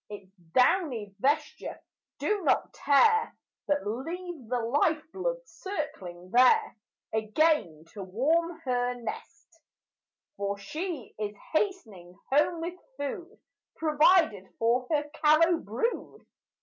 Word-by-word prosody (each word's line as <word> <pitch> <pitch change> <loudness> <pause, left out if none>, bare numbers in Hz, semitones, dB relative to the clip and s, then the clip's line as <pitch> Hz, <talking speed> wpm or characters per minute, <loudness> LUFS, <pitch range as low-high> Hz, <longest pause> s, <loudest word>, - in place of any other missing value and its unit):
Its 200 -2 -10 0.2
downy 250 - +2
vesture 285 +7 -1 0.4
do 420 -1 0
not 330 - +1
tear; 440 +11 +3 0.3
But 290 -4 0
leave 305 - -5
the 250 -1 0
life 290 +7 +1
blood - - -1
circling 190 - -6
there, 430 - +5 0.4
Again 220 - +1
to 205 - -9
warm 315 - 0
her 250 -3 0
nest; 275 +7 -9 0.8
For 200 0 -2
she 300 - -5
is 210 -1 -3 0.2
hastening 220 - -2
home 305 +4 +3
with 350 +2 -5 0.2
food 340 +8 -5 0.4
Provided 305 - +3
for 240 +2 +1
her 295 -2 +1 0.2
callow 330 +3 +5
brood. 230 - -3
285 Hz, 110 wpm, -28 LUFS, 220-335 Hz, 0.8 s, there